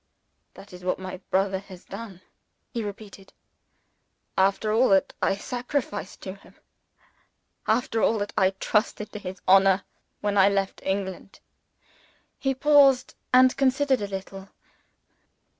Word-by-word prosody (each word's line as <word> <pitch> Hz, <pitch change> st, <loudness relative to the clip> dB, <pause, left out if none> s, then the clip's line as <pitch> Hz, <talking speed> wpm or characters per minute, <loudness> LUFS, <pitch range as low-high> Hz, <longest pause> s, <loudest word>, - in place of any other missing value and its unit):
"That 200 Hz, -, -14 dB
is 180 Hz, 0 st, -11 dB
what 180 Hz, -, 0 dB
my 185 Hz, 0 st, -7 dB
brother 190 Hz, 0 st, +1 dB
has 190 Hz, -2 st, -13 dB
done," 200 Hz, -6 st, -9 dB, 0.5 s
he 235 Hz, -2 st, -3 dB
repeated. 200 Hz, -1 st, -9 dB, 1.0 s
"After 200 Hz, +3 st, +2 dB
all 245 Hz, +4 st, +4 dB
that 195 Hz, -1 st, +3 dB
I 195 Hz, -, +2 dB
sacrificed 245 Hz, +1 st, -4 dB
to 190 Hz, -, -6 dB
him 200 Hz, -, -19 dB, 1.1 s
after 225 Hz, 0 st, +1 dB
all 225 Hz, -, +3 dB
that 205 Hz, 0 st, -4 dB
I 190 Hz, -1 st, +4 dB
trusted 210 Hz, -1 st, 0 dB
to 210 Hz, -, -7 dB
his 190 Hz, -1 st, -8 dB
honor 195 Hz, 0 st, +5 dB, 0.4 s
when 205 Hz, -1 st, 0 dB
I 195 Hz, +1 st, +6 dB
left 195 Hz, -1 st, -1 dB
England." 190 Hz, 0 st, -4 dB, 1.0 s
He 270 Hz, -1 st, 0 dB
paused, 275 Hz, -2 st, +4 dB, 0.2 s
and 255 Hz, 0 st, +6 dB
considered 270 Hz, -1 st, +2 dB
a 205 Hz, -, -2 dB
little. 195 Hz, 0 st, -7 dB
200 Hz, 130 wpm, -25 LUFS, 190-240 Hz, 1.1 s, I